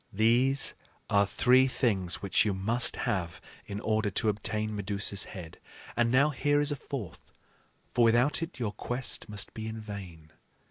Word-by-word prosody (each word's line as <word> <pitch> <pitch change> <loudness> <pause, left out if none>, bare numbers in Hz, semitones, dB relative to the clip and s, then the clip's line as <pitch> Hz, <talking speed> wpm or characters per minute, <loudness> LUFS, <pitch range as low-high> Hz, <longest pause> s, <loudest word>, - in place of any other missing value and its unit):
"These 120 +6 +3 0.4
are 100 -1 +4
three 130 +5 +4
things 100 -10 0
which 100 - +3
you 105 -3 0
must 115 +6 +1
have 95 -8 -2 0.3
in 100 0 -5
order 110 0 0
to 110 - 0
obtain 110 +1 -1
Medusa's 100 0 0
head; 85 -3 -9 0.4
and 120 -1 +2
now 140 +5 +4
here 145 +1 +1
is 145 0 +2
a - - 0
fourth, 125 - -7 0.6
for 120 - +3
without 120 +7 +3
it 165 +2 -5
your 115 -5 -2
quest 120 +5 -3
must 105 -1 -1
be 110 0 -6
in 110 0 -5
vain." 95 -7 -9
110 Hz, 165 wpm, -29 LUFS, 100-125 Hz, 0.6 s, are